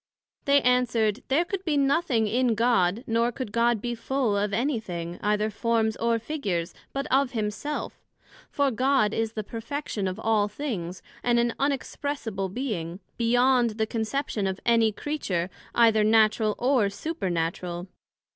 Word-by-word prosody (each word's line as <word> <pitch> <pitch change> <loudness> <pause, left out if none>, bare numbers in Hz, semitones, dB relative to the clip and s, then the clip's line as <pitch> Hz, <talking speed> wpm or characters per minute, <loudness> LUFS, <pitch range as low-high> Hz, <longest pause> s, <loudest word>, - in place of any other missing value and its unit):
They 280 0 +4
answered, 245 -3 +2
There 305 +6 +2
could 380 +1 -4
be 310 -5 0
nothing 275 -4 +2
in 240 +1 +2
God, 225 -2 +2
nor 230 0 +1
could 250 -3 -5
God 235 0 +2
be 240 +3 -3
full 245 -2 0
of 205 0 0
any 240 +4 0
thing, 175 -4 -6
either 210 +1 +1
forms 220 0 +1
or 230 0 +1
figures, 210 - -3 0.2
but 275 0 -3
of 265 -1 +3
himself; 220 +7 -3 0.5
for 280 -1 +1
God 255 -3 +2
is 225 0 -1
the 215 - -3
Perfection 230 -1 -4
of 185 +3 -4
all 220 -2 +2
things, 205 - -5 0.2
and 240 -1 +2
an 235 -1 +2
Unexpressible 275 -7 -2
Being, 190 -8 -3 0.2
beyond 245 -1 +3
the 220 - +1
conception 220 -1 -2
of 190 0 -3
any 230 -2 +4
Creature, 195 - -3 0.2
either 225 -2 +5
Natural 215 0 +3
or 245 -5 +2
Supernatural. 180 - -3
230 Hz, 145 wpm, -26 LUFS, 210-260 Hz, 0.5 s, either